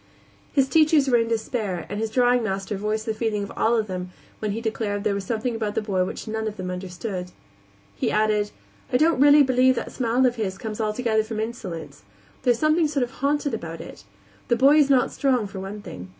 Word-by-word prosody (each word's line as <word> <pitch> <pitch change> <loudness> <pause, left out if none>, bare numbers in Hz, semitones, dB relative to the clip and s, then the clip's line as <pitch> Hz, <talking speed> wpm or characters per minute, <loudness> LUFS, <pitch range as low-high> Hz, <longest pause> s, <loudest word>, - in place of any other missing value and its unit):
His 275 -2 +3
teachers 310 -1 +4
were 245 -2 +4
in 230 - 0
despair, 220 -5 -2
and 205 - -4
his 225 0 -1
drawing 245 +1 +3
master 195 -1 -2
voiced 215 +2 -2
the 220 - -1
feeling 215 -2 -1
of 200 - -6 0.4
them 180 -2 -5
all - - -24 0.2
when 215 - -2
he 225 - -3
declared 215 -3 -2
there 210 -2 +1
was 200 -1 -3
something 230 +3 -2
about 215 -2 -3
the - - +1
boy 190 -3 0
which 185 - -6
none 220 0 -2
of 215 0 -5
them 185 -1 -4
understood. 180 0 -5 0.7
He - - -1
added: 210 -1 +1 0.4
"I 250 - +4
don't 310 0 +3
really 290 0 +8
believe 260 0 +4
that - - -4
smile 250 +1 +1
of 245 -1 +1
his 190 -4 -2
comes 220 +1 -5
altogether 220 +1 +1
from 220 0 -5
insolence; 185 - -6 0.4
there's 245 -3 +3
something 310 +3 +3
sort 285 -3 0
of 245 - -4
haunted 285 0 +1
about 165 -6 -5
it. - - -10 0.4
The 240 - +3
boy 275 +5 +5
is 290 -2 +4
not 265 -2 +3
strong, 255 -6 +1
for 195 -1 -7
one 200 +2 -7
thing. 90 0 -9
220 Hz, 215 wpm, -24 LUFS, 200-250 Hz, 0.7 s, really